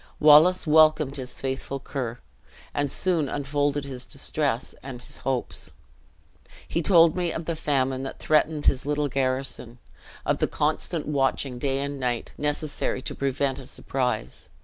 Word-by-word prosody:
Wallace 155 +5 +7
welcomed 155 -2 +4
his 125 -2 -4
faithful 135 +1 -3
Ker, 125 -4 -4 0.6
and 145 0 0
soon 165 -3 +1
unfolded 145 0 -1
his 130 -2 -5
distress 140 -3 -2
and 130 -2 -7
his 125 - -6
hopes. 130 -2 -2 1.0
He 170 - -1
told 170 -2 +6
me 175 -2 0
of 165 - -4
the 165 - -2
famine 135 -4 0
that 135 - -6
threatened 155 0 +1
his 130 +1 +2
little 150 0 0
garrison; 130 -2 -2 0.5
of - - +1
the - - +2
constant - - 0
watching, 135 -3 0
day 135 0 0
and 140 0 -4
night, 125 -2 -2
necessary 150 -3 -2
to - - -4
prevent 140 0 -1
a 130 - -10
surprise. 125 - -3
140 Hz, 150 wpm, -26 LUFS, 130-150 Hz, 1.0 s, Wallace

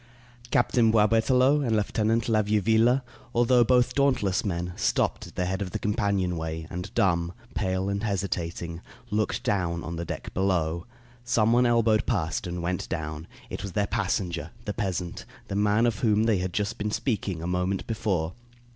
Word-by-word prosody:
Captain 120 -1 +3
Boisberthelot 125 +6 +4
and 115 -4 +1
Lieutenant 110 +2 +1
la 110 -2 +3
Vieuville, 110 +5 +3 0.3
although 120 +1 +5
both 125 +1 +3
dauntless 130 -9 +2
men, 90 -2 -2
stopped - - 0
at - - -15
the 90 - 0
head 95 +2 -2
of 95 - -2
the - - -3
companion 100 -5 0
way 80 0 -4
and, 90 -1 -5
dumb, 85 -2 +2 0.2
pale, 95 -1 -1
and 100 0 -1
hesitating, 90 -5 -3 0.3
looked 105 0 0
down 85 -4 0
on 85 +2 -5
the 85 - -3
deck - - -6
below. 85 -2 0 0.4
Some 115 -2 +2
one 125 +1 +4
elbowed 115 -2 +3
past 90 -4 -1
and 85 0 -4
went 90 +1 -2
down. 80 -2 -4 0.2
It - - -4
was 100 -1 -6
their 100 +2 +1
passenger, 90 -6 -2 0.2
the 105 - -2
peasant, 90 -5 -3 0.3
the 100 - -3
man 105 +3 +3
of 115 -4 0
whom 110 -2 +3
they 110 -4 +2
had 90 0 -2
just 105 +5 -2
been 105 0 -1
speaking 100 - -2
a - - -3
moment 90 +2 -1
before. 95 -7 -1
100 Hz, 175 wpm, -27 LUFS, 90-110 Hz, 0.4 s, although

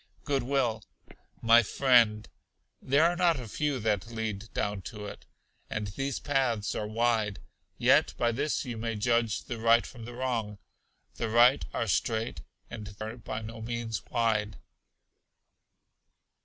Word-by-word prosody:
Good 140 -2 0
will. 120 -4 0 0.6
My 115 +1 +7
friend, 115 -3 +3 0.5
there 140 +4 +3
are 170 +1 +3
not 170 -4 +3
a 120 - -7
few 145 +5 -1
that 105 -1 0
lead 110 -2 -5
down 100 -1 -2
to 105 -2 -8
it, 100 - -9 0.4
and 105 -1 -3
these 135 +5 -3
paths 130 -7 0
are 105 - -3
wide: 110 -2 0 0.4
yet - - +4
by 120 -1 +2
this 145 +5 -1
you 120 -3 -5
may 115 0 -2
judge 115 0 +1
the 120 -3 -6
right 115 +1 +4
from 115 -3 -10
the 120 0 -8
wrong 115 -5 -2 0.6
the 115 - -2
right 120 +4 +5
are - - -1
straight 110 -3 -1 0.3
and 105 -3 -8
are 110 +2 -5
by 110 -1 -5
no 110 +1 -8
means 115 -1 -3
wide. 110 -3 0
115 Hz, 145 wpm, -29 LUFS, 110-125 Hz, 0.6 s, My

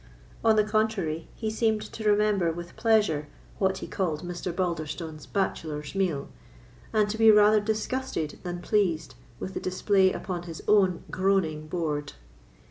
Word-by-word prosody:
On 225 -1 +5
the 215 - +4
contrary, 210 -7 0
he 220 -2 -3
seemed 220 -1 +1
to 220 - -8
remember 205 -4 +3
with 170 +1 -8
pleasure 205 -10 +2 0.3
what 190 -1 +2
he - - -10
called 165 -5 -2
Mr. 175 0 -4
Balderstone's 160 -3 -3
bachelor's 155 -6 -2
meal, 180 -8 0 0.6
and 215 -1 +3
to 215 +2 -4
be 225 0 +7
rather 210 0 +7
disgusted 215 - -2
than 175 -1 -5
pleased 175 -7 +1 0.3
with 190 - -5
the - - -3
display 190 +1 +2
upon 180 -2 -4
his 165 - -8
own 190 -4 +3
groaning 185 -5 +1
board. 155 -3 -2
190 Hz, 145 wpm, -27 LUFS, 165-210 Hz, 0.6 s, be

